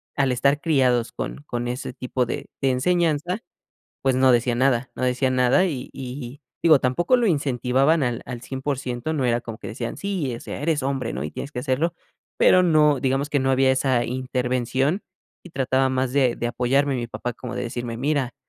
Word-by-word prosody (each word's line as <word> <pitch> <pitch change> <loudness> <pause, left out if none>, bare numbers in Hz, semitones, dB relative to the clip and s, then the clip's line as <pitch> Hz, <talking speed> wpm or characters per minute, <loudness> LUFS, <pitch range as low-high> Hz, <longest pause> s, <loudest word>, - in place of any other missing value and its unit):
al 135 -2 +2
estar 140 +4 +2
criados 130 -6 +2
con 145 - -6
con 120 0 -3
ese 125 +1 -4
tipo 125 0 -2
de 120 - -5
de 135 -1 +2
enseñanza, 170 - +1 0.6
pues 135 -1 +2
no 130 0 +4
decían 120 0 +2
nada 130 -1 +2
no - - -6
decían 130 +1 +1
nada 130 +9 +4
y 135 -7 -4
y 130 0 -7 0.2
digo, 155 -4 +6
tampoco 170 - +2
lo 240 - +1
incentivaban 140 - +2
al 120 -2 -2
al 125 -2 -6
100%, 130 0 -3
no 140 -5 -1
era 120 -1 +2
como 115 -2 -8
que - - -9
decían: 115 +1 -5
"Sí, 185 -10 -2
o - - -10
sea, - - -7
eres 150 -4 0
hombre, 135 -4 -2
¿no? 65 - -4
Y 75 - -5
tienes 140 - -6
que 135 - -6
hacerlo". 140 +6 0 0.4
Pero 185 - +5
no 150 -4 +4
digamos 135 +1 0
que 145 -2 +1
no 135 0 +1
había 130 0 +4
esa 130 -2 +1
intervención 130 - -1 0.4
y 180 - -13
trataba 130 -2 +1
más 130 -1 -1
de 130 -4 +2
de 120 - -2
apoyarme 135 +4 +1
mi 120 -2 -3
papá, 125 +1 -4
como 125 +1 -7
de - - -2
decirme: 120 -1 -4
"Mira, 140 0 -1
130 Hz, 200 wpm, -23 LUFS, 125-145 Hz, 0.6 s, digo